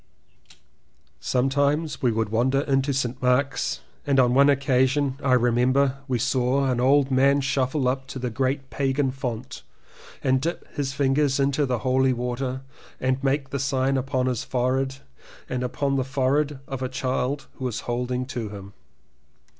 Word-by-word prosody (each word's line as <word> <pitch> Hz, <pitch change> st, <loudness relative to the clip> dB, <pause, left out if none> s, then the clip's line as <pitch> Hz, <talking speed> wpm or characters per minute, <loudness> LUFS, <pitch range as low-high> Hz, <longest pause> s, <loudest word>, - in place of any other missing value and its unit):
Sometimes 140 Hz, -, 0 dB
we 125 Hz, -, +3 dB
would 110 Hz, -1 st, -1 dB
wander 130 Hz, +5 st, +2 dB
into 135 Hz, 0 st, +1 dB
St. 130 Hz, -2 st, -2 dB
Mark's 125 Hz, +1 st, +1 dB, 0.2 s
and 140 Hz, -2 st, +2 dB
on 125 Hz, -1 st, +4 dB
one 140 Hz, +2 st, +6 dB
occasion 135 Hz, 0 st, +2 dB
I 130 Hz, -, +3 dB
remember 125 Hz, +3 st, +2 dB
we 130 Hz, -2 st, 0 dB
saw 130 Hz, +2 st, +1 dB
an 120 Hz, -, -1 dB
old 135 Hz, +2 st, +3 dB
man 135 Hz, +2 st, +4 dB
shuffle 135 Hz, 0 st, 0 dB
up 130 Hz, +1 st, -1 dB
to 140 Hz, -, -7 dB
the 125 Hz, -2 st, -3 dB
great 135 Hz, +3 st, -2 dB
pagan 135 Hz, 0 st, 0 dB
font 125 Hz, -4 st, -5 dB, 0.6 s
and 130 Hz, -1 st, +2 dB
dip 170 Hz, +4 st, -3 dB
his 135 Hz, -2 st, -2 dB
fingers 140 Hz, 0 st, +1 dB
into 140 Hz, +1 st, +1 dB
the 125 Hz, -1 st, 0 dB
holy 130 Hz, 0 st, +3 dB
water 125 Hz, +2 st, -3 dB, 0.4 s
and 130 Hz, +1 st, 0 dB
make 135 Hz, 0 st, 0 dB
the 140 Hz, -, -2 dB
sign 135 Hz, 0 st, +1 dB
upon 130 Hz, -1 st, 0 dB
his 125 Hz, -3 st, -1 dB
forehead 130 Hz, +1 st, 0 dB, 0.5 s
and 125 Hz, -1 st, -3 dB
upon 135 Hz, +2 st, -1 dB
the 130 Hz, -, +1 dB
forehead 140 Hz, +2 st, 0 dB
of 135 Hz, -2 st, -5 dB
a 130 Hz, -, -2 dB
child 135 Hz, +1 st, -2 dB
who 130 Hz, -, -5 dB
was 125 Hz, -4 st, -3 dB
holding 125 Hz, +1 st, -2 dB
to 120 Hz, -5 st, -5 dB
him. 100 Hz, -1 st, -10 dB
130 Hz, 160 wpm, -24 LUFS, 125-140 Hz, 0.6 s, one